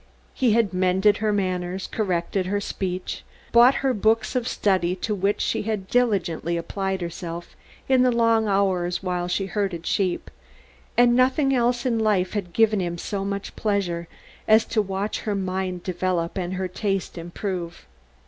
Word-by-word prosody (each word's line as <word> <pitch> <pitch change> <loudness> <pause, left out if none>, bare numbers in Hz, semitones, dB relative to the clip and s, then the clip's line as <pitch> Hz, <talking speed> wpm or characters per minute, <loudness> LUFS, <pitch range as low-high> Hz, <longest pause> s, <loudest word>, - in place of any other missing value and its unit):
He 245 -5 +2
had 220 -4 +2
mended 185 +3 +3
her 215 0 0
manners, 185 -2 -1
corrected 185 -2 -1
her 205 +2 0
speech, 185 -2 -4 0.3
bought 240 +3 +7
her 265 - +3
books 220 +1 +1
of 250 -1 0
study 185 -6 +1
to 210 +3 -2
which 200 +1 0
she - - 0
had 210 -3 -3
diligently 180 -8 +1
applied 190 +2 -3
herself 170 0 -6 0.3
in 260 -1 +4
the 255 0 +4
long 230 -2 +3
hours 190 -3 +1
while 180 -1 -1
she 190 +2 -1
herded 190 -3 -2
sheep, 190 -4 -1 0.7
and 240 0 +5
nothing 265 +2 +3
else 245 0 +1
in 235 -3 +1
life 205 -4 +1
had 200 -5 -3
given 220 +1 +3
him 175 -2 -2
so 195 +3 -3
much 200 0 -4
pleasure 185 -5 -1 0.4
as 220 +1 +5
to 215 - +1
watch 195 +1 -3
her 210 -2 -2
mind 185 -2 -2
develop 180 -2 -1
and 185 -1 -3
her 185 0 -2
taste 195 +1 -2
improve. 175 0 -5
195 Hz, 160 wpm, -24 LUFS, 180-220 Hz, 0.7 s, bought